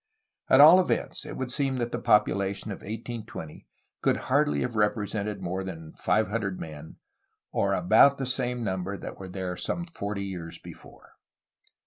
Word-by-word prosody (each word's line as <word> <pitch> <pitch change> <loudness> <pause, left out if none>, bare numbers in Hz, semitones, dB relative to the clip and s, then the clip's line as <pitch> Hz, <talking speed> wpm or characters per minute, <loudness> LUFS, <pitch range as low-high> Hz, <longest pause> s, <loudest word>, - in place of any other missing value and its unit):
At 130 - +6
all 160 +5 +10
events, 185 - -1
it - - -7
would 130 -1 -3
seem 135 -1 0
that 120 -1 -2
the 120 - -2
population 100 -2 +2
of 95 - -5
1820 110 -5 -7 0.3
could - - +2 0.2
hardly 70 -1 +3
have 120 - -2
represented 105 -1 -1
more 95 +2 -2
than 80 -4 -8
five 110 0 +1
hundred 105 -4 -2
men, 80 -1 -9 0.3
— - - -50
or - - +1
about 110 +10 +5
the 135 - -2
same 125 -1 -2
number 95 -1 -2
that - - -7 0.2
there 95 -1 -4
were 90 - -4
some 175 - -2
forty 100 - -4
years 90 -4 -6
before. - - -14
105 Hz, 165 wpm, -27 LUFS, 95-120 Hz, 0.3 s, all